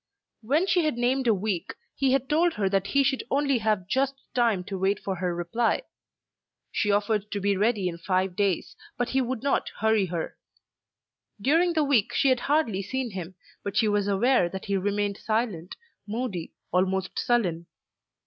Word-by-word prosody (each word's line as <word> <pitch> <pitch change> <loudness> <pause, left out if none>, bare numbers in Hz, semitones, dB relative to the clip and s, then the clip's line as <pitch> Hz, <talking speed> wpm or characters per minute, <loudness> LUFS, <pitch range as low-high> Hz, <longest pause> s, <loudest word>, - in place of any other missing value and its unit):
When 285 +11 +2
she 360 -3 +2
had 305 -6 0
named 250 +2 +1
a 225 - +5
week, 195 -3 -3 0.2
he 270 -2 +1
had 270 -1 +1
told 330 +4 +2
her 205 -3 0
that 195 0 +1
he 280 0 +3
should 270 -1 0
only 280 -2 +2
have 215 -4 0
just 270 +4 +1 0.2
time 230 -7 +2
to 190 +1 -5
wait 195 +2 +1
for 190 -2 -3
her 175 -1 -1
reply. 225 - 0 0.9
She 210 - 0
offered 205 0 +1
to 205 - -2
be 200 0 +1
ready 205 -1 +1
in 170 -1 -4
five 185 +1 0
days, 195 -2 0 0.2
but 245 0 -1
he 265 - +2
would 255 -1 -3
not 280 - +1
hurry 220 -3 +2
her. 170 -2 -4 1.0
During 330 - +3
the 315 -2 +2
week 270 -8 +2
she 275 - +4
had 255 -1 +3
hardly 275 -10 +1
seen 250 +4 -3
him, 185 -1 -6 0.3
but 200 - -3
she 220 - +4
was 205 -1 +1
aware 205 -1 +3
that 190 +2 -7
he 200 - 0
remained 200 +1 0
silent, 215 -7 -2 0.3
moody, 210 -6 -4 0.2
almost 185 +1 0
sullen. 180 -9 0
210 Hz, 180 wpm, -26 LUFS, 190-260 Hz, 1.0 s, a